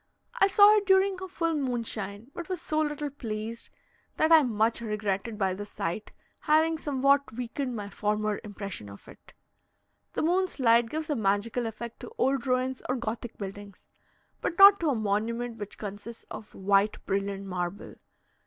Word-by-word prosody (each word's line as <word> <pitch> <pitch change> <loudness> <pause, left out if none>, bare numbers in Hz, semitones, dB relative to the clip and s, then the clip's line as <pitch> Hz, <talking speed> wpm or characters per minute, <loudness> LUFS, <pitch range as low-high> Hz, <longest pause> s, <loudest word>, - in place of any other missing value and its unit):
I 390 - +6
saw 410 +2 +7
it 405 -2 -1
during 380 -1 +3
a 375 - -5
full 330 -2 -1
moonshine, 230 -5 -3
but 345 +1 -7
was 370 -2 -2
so 310 -2 -1
little 295 -1 -1
pleased, 225 -3 -6 0.5
that 315 - +2
I 320 -1 +9
much 230 -2 +1
regretted, 210 0 -2
by 190 -2 +1
this 205 +2 -7
sight, 170 +6 -4 0.3
having 315 +1 +2
somewhat 280 -1 +2
weakened 250 +2 -4
my 205 -2 -5
former 210 0 -1
impression 200 - -7
of 100 - -13
it. - - -16 0.8
The - - -1
moon's 365 +1 +1
light 230 -2 +4
gives 310 +3 -3
a - - +1
magical 220 +2 0
effect 230 +1 -7
to - - -9
old 265 0 +1
ruins 255 0 0
or 255 - +1
Gothic 230 -1 -5
buildings, 200 0 -8 0.6
but 345 - -2
not 400 0 +9
to 330 - +1
a 275 - +1
monument 225 +3 -1
which 205 -2 -8
consists 210 +3 -7
of 215 - -9
white 200 +2 +2
brilliant 195 0 -2
marble. 180 +1 -4
230 Hz, 165 wpm, -28 LUFS, 205-295 Hz, 0.8 s, I